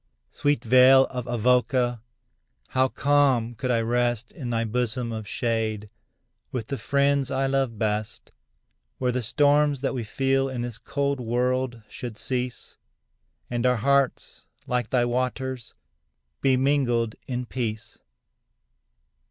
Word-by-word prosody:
Sweet 145 Hz, -4 st, 0 dB
vale 130 Hz, +2 st, +7 dB
of 125 Hz, -2 st, -5 dB
Avoca! 120 Hz, 0 st, +1 dB, 0.7 s
how 130 Hz, 0 st, +2 dB
calm 135 Hz, -4 st, +2 dB
could 125 Hz, +3 st, -4 dB
I 115 Hz, -2 st, +2 dB
rest 120 Hz, 0 st, 0 dB
In 130 Hz, -7 st, -6 dB
thy 115 Hz, -1 st, 0 dB
bosom 120 Hz, +1 st, -1 dB
of 110 Hz, -2 st, -5 dB
shade, 110 Hz, -3 st, -2 dB, 0.6 s
with 115 Hz, -4 st, -4 dB
the 140 Hz, -, -3 dB
friends 140 Hz, -1 st, +1 dB
I 135 Hz, 0 st, 0 dB
love 135 Hz, -4 st, 0 dB
best, 105 Hz, 0 st, -3 dB, 0.7 s
Where 125 Hz, -1 st, 0 dB
the 125 Hz, +1 st, -1 dB
storms 145 Hz, +3 st, +3 dB
that 140 Hz, -, -1 dB
we 125 Hz, -3 st, -3 dB
feel 135 Hz, +4 st, 0 dB
in 130 Hz, -2 st, -4 dB
this 120 Hz, -1 st, -5 dB
cold 140 Hz, +2 st, -2 dB
world 125 Hz, 0 st, -1 dB
should 120 Hz, -4 st, -7 dB
cease, 125 Hz, +2 st, -4 dB, 0.7 s
And 120 Hz, -1 st, -2 dB
our 125 Hz, 0 st, +3 dB
hearts, 140 Hz, +3 st, 0 dB, 0.2 s
like 125 Hz, -2 st, -1 dB
thy 125 Hz, -2 st, +2 dB
waters, 130 Hz, 0 st, -3 dB, 0.7 s
be 130 Hz, -1 st, +3 dB
mingled 125 Hz, -5 st, +1 dB
in 125 Hz, -1 st, -3 dB
peace. 115 Hz, -3 st, -5 dB
125 Hz, 130 wpm, -25 LUFS, 115-135 Hz, 0.7 s, vale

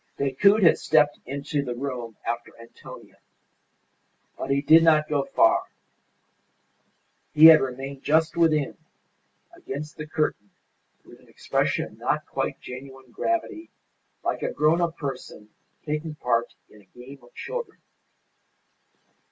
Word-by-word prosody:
Decoud 195 Hz, +10 st, +3 dB
had 170 Hz, -, +5 dB
stepped 150 Hz, -2 st, +2 dB
into 140 Hz, +2 st, -3 dB
the 125 Hz, -3 st, -5 dB
room 120 Hz, -4 st, -6 dB
after 120 Hz, 0 st, -5 dB
Antonia. 115 Hz, 0 st, -14 dB, 1.2 s
But -, -, -6 dB
he 140 Hz, 0 st, +2 dB
did 160 Hz, +2 st, +7 dB
not 155 Hz, -2 st, +4 dB
go 145 Hz, -2 st, -1 dB
far. 355 Hz, +2 st, +3 dB, 1.7 s
He 155 Hz, +1 st, +8 dB
had 160 Hz, -1 st, +10 dB
remained 135 Hz, +1 st, -5 dB
just 160 Hz, +2 st, +1 dB
within, 155 Hz, -4 st, +1 dB, 0.8 s
against 150 Hz, +3 st, -8 dB
the 150 Hz, -, -7 dB
curtain, 150 Hz, -10 st, -2 dB, 0.6 s
with -, -, -16 dB
an -, -, -23 dB
expression -, -, -1 dB
of -, -, -15 dB
not -, -, -1 dB
quite -, -, -4 dB
genuine 130 Hz, 0 st, -11 dB
gravity, 335 Hz, -, -3 dB, 0.5 s
like -, -, -2 dB
a -, -, -2 dB
grown 155 Hz, +4 st, +2 dB
up 170 Hz, -1 st, -1 dB
person 130 Hz, -6 st, -7 dB, 0.4 s
taking 150 Hz, 0 st, -4 dB
part 120 Hz, -4 st, -1 dB
in 105 Hz, -, -19 dB
a -, -, -25 dB
game 135 Hz, +3 st, -11 dB
of 120 Hz, -, -21 dB
children. 485 Hz, -1 st, -6 dB
145 Hz, 130 wpm, -25 LUFS, 130-160 Hz, 1.7 s, had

